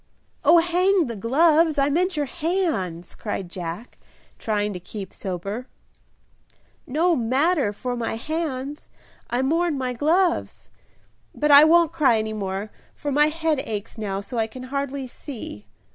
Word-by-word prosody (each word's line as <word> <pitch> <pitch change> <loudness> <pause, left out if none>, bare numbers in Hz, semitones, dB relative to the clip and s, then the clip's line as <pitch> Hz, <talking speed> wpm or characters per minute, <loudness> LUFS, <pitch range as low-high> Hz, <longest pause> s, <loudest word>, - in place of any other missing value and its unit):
"Oh, 330 +4 +7
hang 355 +2 +3
the 235 -3 -5
gloves! 310 - +3
I 275 0 +3
meant 360 +2 +1
your 295 - +1
hands," 280 - -2
cried 195 -4 -5
Jack, 180 +6 -7 0.4
trying 210 -1 -1
to 180 - -6
keep 190 +1 -8
sober. 200 +6 -5 1.2
"No 330 +6 +2
matter 270 - +1
for 245 +4 -4
my 230 -2 -2
hands, 290 +1 -4 0.4
I 245 +2 0
mourn 330 +2 +1
my 255 -1 -2
gloves. 335 +7 0 0.6
But 300 0 +1
I 285 +2 +10
won't 335 0 +4
cry 280 -8 +4
any 220 0 -2
more, 200 0 -4 0.2
for 290 - -4
my 295 +2 +4
head 320 -1 0
aches 220 -2 -5
now 200 -2 -2
so 230 +4 -5
I 220 - +1
can 255 +3 -10
hardly 280 -1 -2
see." 240 - -9
265 Hz, 145 wpm, -24 LUFS, 215-315 Hz, 1.2 s, I